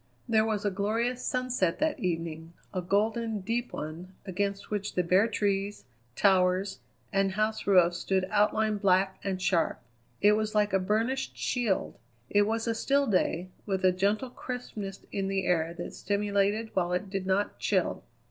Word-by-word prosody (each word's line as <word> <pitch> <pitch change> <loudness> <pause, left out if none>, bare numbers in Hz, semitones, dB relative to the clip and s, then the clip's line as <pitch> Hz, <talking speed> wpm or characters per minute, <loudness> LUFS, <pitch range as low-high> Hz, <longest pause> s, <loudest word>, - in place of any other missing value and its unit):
There 220 -2 +3
was 210 -2 -1
a 205 - +2
glorious 225 +6 -1
sunset 250 -9 0
that 310 0 0
evening, 165 -2 -3 0.2
a 185 - -1
golden, 220 +3 0
deep 235 +5 -2
one, 165 +5 -7
against 200 +1 -3
which 205 -1 -2
the 180 - +2
bare 185 +5 +4
trees, 205 -2 -1 0.3
towers, 190 0 +3 0.3
and 195 -1 +2
house 215 +1 -1
roofs 175 -3 +5
stood 190 -1 0
outlined 210 0 +2
black 190 -1 +3
and 190 -2 -2
sharp. 185 -3 +1 0.4
It 205 - +6
was 215 0 0
like 210 -2 +2
a 195 - +4
burnished 225 +8 -1
shield. 235 - -1 0.3
It 205 0 +4
was 225 +1 -1
a 230 - +1
still 280 +5 +2
day, 185 -4 0 0.2
with 190 -2 0
a 185 - +6
gentle 205 +7 0
crispness 220 -7 -6
in 195 -1 -1
the 195 -1 -1
air 165 -2 +1
that - - -6
stimulated 205 +2 0
while 180 -2 +1
it 190 +2 -2
did 195 -1 -3
not 195 +2 0
chill. - - 0
200 Hz, 165 wpm, -29 LUFS, 185-220 Hz, 0.4 s, It